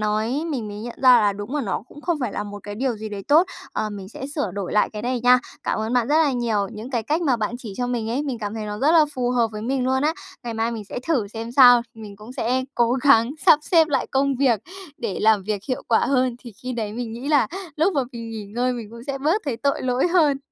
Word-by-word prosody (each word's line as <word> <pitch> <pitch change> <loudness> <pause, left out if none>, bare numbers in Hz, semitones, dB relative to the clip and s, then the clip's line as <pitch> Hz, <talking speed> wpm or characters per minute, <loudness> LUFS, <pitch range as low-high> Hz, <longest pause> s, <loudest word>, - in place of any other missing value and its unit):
nói 215 +7 0
mình 240 -8 -3
mới 205 - -7
nhận 230 +3 -8
ra 250 -2 +8
là 205 -1 +3
đúng 205 +6 -6
là 295 - 0
nó 195 - -2
cũng 295 - -13
không 335 0 -1
phải 245 -5 -2
là - - -3
một 205 -1 -8
cái 205 0 -7
điều 245 +1 -1
gì 215 +1 -6
đấy 205 -2 -6
tốt. 320 +5 +6 0.3
Ờ, 215 - -2
mình 200 -2 -8
sẽ 260 +5 -7
sửa 285 - -1
đổi 195 -2 -4
lại 210 - +2
cái 210 -1 -6
này 250 +1 -1
nha, 250 +1 +6 0.2
cảm - - -1
ơn 220 +2 -2
bạn 245 -1 +2
rất 300 +2 +4
là 285 - +2
nhiều. 225 -5 0
Những 220 +4 -8
cái 240 -4 -1
cách 310 +9 -1
mà 265 -6 +2
bạn 220 +1 -2
chỉ 225 -5 -8
cho 245 - -1
mình 230 -2 -2
ấy, 270 +5 -1
mình 265 -5 -3
cảm 210 -1 -4
thấy 220 -1 -4
nó 210 0 -5
rất 290 +7 +3
là 325 -2 +6
phù 245 -1 0
hợp 240 -2 +2
với 210 0 -6
mình 255 +2 -1
luôn 260 +1 +1
á, 310 +2 +1 0.3
ngày 235 -2 -5
mai 225 +1 0
mình 225 -3 -5
sẽ 205 - -6
thử 250 -11 +1
xem 225 +2 -6
sao. 245 -2 +8
Mình 215 -3 -10
cũng 215 +4 -11
sẽ 255 +1 0
cố 235 0 +2
gắng 255 -3 +4 0.2
sắp 295 - +8
xếp 325 -2 +4
lại 275 -3 0
công 275 +1 +1
việc 245 -6 +2 0.4
để 225 -5 -3
làm 215 -2 +4
việc 205 0 -3
hiệu 255 - -2
quả 225 - +4
hơn, 255 -2 +1
thì 240 -2 -11
khi 255 0 -4
đấy 220 -3 -3
mình 230 0 -5
nghĩ 245 +5 -6
là 295 -3 +4 0.3
lúc 330 +6 +2
mà 290 - +1
mình 230 -1 -7
nghỉ 220 -2 -6
ngơi 245 +5 -1
mình 235 -3 -6
cũng 235 0 -10
sẽ 275 -1 -3
bớt 320 +10 +1
thấy 270 -6 -2
tội 280 +4 -1
lỗi 255 +5 +1
hơn. 310 -6 +3
240 Hz, 285 wpm, -23 LUFS, 215-270 Hz, 0.4 s, ra